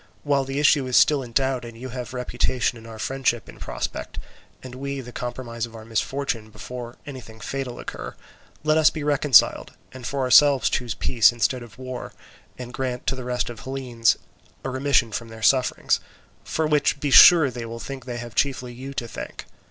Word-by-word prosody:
While 140 -2 +1
the 135 +1 -4
issue 145 -2 +4
is 125 - +3
still 145 -2 +5
in 120 -2 -9
doubt, 130 0 0
and 115 -1 -9
you 130 +2 -7
have 125 0 -6
reputation 125 0 -1
and 115 -1 -12
our 110 -1 -9
friendship 130 0 -1
in - - -13
prospect, - - -5 0.5
and 130 -1 -9
we 140 +2 -4
the 125 -2 -8
compromise 120 -1 -5
of 115 - -15
our 110 -1 -10
misfortune 115 0 -2
before 120 +3 -8
anything 125 -6 -10
fatal 130 +2 -5
occur, - - -7 0.5
let 155 +1 +3
us 155 - +6
be 155 - -6
reconciled, 145 -3 +4 0.2
and 125 -1 -8
for 140 -1 -2
ourselves 135 +1 +5
choose 120 -3 -1
peace 115 -2 +4
instead 120 +2 0
of 120 -3 -12
war, 130 -1 -7 0.4
and 125 -1 -8
grant 125 -1 -3
to 135 - 0
the 130 - -7
rest 125 0 -1
of 120 - -10
the - - -12
Hellenes 125 -4 +1 0.5
a 135 - -3
remission 130 -3 +2
from 115 +1 -4
their 115 -1 -11
sufferings, 130 +1 +3 0.4
for 160 - -1
which 150 -1 +2
be 145 -1 -2
sure 160 -2 +9
they 120 -1 -6
will 115 +1 -6
think 135 0 -7
they 120 -2 -5
have 120 -1 -7
chiefly 130 0 -1
you 135 +3 -8
to 120 - -3
thank. - - -8
125 Hz, 200 wpm, -24 LUFS, 120-135 Hz, 0.5 s, sure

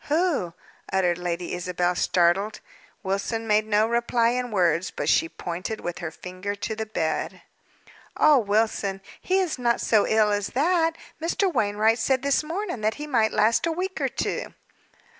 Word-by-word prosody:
"Who?" 300 - 0 0.4
uttered 180 -2 +1
Lady 175 0 -3
Isabel, 180 0 -1
startled. 180 +4 +1 0.4
Wilson 200 +4 -2
made 215 0 +2
no 215 0 +3
reply 235 0 +1
in 250 0 -1
words, 180 -4 +1
but - - -5
she 165 - +3
pointed 180 +7 -5
with 175 - -5
her 170 - -4
finger 185 +5 -6
to 220 +2 -4
the 220 0 -4
bed. 160 -7 -2 0.7
"Oh, 300 -3 +6
Wilson, 205 -2 0 0.2
he 375 - +1
is 360 -8 -1
not 235 -1 +1
so 215 -2 +3
ill 215 -1 +3
as 205 -1 0
that. 330 +2 +2 0.2
Mr. 350 +3 0
Wainwright 220 0 +2
said 260 +3 +1
this 280 +1 +2
morning, 340 - -4
that 215 +1 0
he 295 - -6
might 230 -7 +2
last 220 +8 +2
a - - 0
week 370 +3 -3
or - - +1
two." - - -3
220 Hz, 165 wpm, -25 LUFS, 190-265 Hz, 0.7 s, Oh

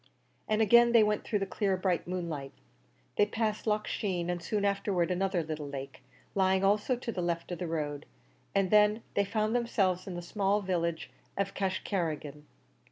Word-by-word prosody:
And 215 +1 +3
again 235 +2 +6
they 230 -2 +7
went 210 0 +1
through 215 - 0
the 195 - -1
clear 195 -2 0
bright 185 -2 0
moonlight. 170 -6 -4 0.6
They 205 - +5
passed 215 0 -2
Loch 210 0 +1
Sheen, 180 -4 -1
and 175 -1 -3
soon 205 +4 -1
afterwards 195 -3 +1
another 185 -1 0
little 155 -2 -5
lake, 135 -1 -7 0.3
lying 190 0 +2
also 210 +6 +3
to 240 -1 -4
the 185 - -3
left 170 0 -2
of 175 - -4
the 180 - -3
road, 150 -3 -3 0.5
and 195 -2 +2
then 210 +1 +5
they 200 - +3
found 215 +3 0
themselves 195 -7 +1
in 185 - -5
the 175 - -5
small 200 +3 +1
village 170 -4 -2 0.3
of 195 0 -1
Cashcarrigan. 165 -6 -2
190 Hz, 175 wpm, -30 LUFS, 170-210 Hz, 0.6 s, they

